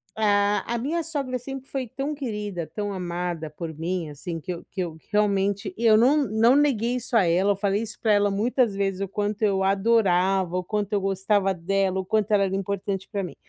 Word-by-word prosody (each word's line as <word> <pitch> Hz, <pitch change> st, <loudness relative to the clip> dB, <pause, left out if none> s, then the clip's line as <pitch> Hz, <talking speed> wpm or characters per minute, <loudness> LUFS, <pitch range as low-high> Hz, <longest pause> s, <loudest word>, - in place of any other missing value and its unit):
A 205 Hz, -1 st, +2 dB
a -, -, 0 dB
minha 320 Hz, +7 st, -1 dB
sogra 280 Hz, -6 st, -3 dB
sempre 270 Hz, +1 st, -8 dB
foi 260 Hz, -4 st, -3 dB
tão 275 Hz, +5 st, -3 dB
querida, 210 Hz, -, -4 dB
tão 205 Hz, -1 st, -3 dB
amada 175 Hz, -3 st, -3 dB
por 160 Hz, +1 st, -7 dB
mim, 165 Hz, 0 st, -3 dB
assim, 165 Hz, +3 st, -6 dB
que 180 Hz, -, -5 dB
eu 170 Hz, -, -8 dB
que 190 Hz, -, -15 dB
eu 165 Hz, -3 st, -4 dB
realmente, 200 Hz, -1 st, +1 dB
e 230 Hz, +1 st, 0 dB
eu 215 Hz, -1 st, +7 dB
não 265 Hz, +7 st, +5 dB
não 225 Hz, +4 st, +4 dB
neguei 250 Hz, -4 st, +2 dB
isso 245 Hz, -1 st, -2 dB
a 200 Hz, -, +5 dB
ela, 185 Hz, +4 st, +3 dB
eu -, -, -3 dB
falei 200 Hz, +1 st, 0 dB
isso 220 Hz, -1 st, -7 dB
pra 220 Hz, -2 st, +2 dB
ela 205 Hz, 0 st, +3 dB
muitas 225 Hz, +2 st, +1 dB
vezes, 195 Hz, -1 st, -1 dB
o 195 Hz, -, -2 dB
quanto 205 Hz, +2 st, -2 dB
eu 195 Hz, -2 st, +2 dB
adorava, 195 Hz, -3 st, +2 dB
o -, -, -1 dB
quanto 210 Hz, +1 st, -2 dB
eu 205 Hz, -, +2 dB
gostava 195 Hz, 0 st, +1 dB
dela, 190 Hz, +2 st, 0 dB
o -, -, -5 dB
quanto 215 Hz, +1 st, 0 dB
ela 200 Hz, -2 st, +4 dB
era 190 Hz, 0 st, -2 dB
importante 195 Hz, 0 st, -3 dB
pra 200 Hz, -2 st, -2 dB
mim. 165 Hz, -, -7 dB
200 Hz, 220 wpm, -25 LUFS, 190-225 Hz, -, eu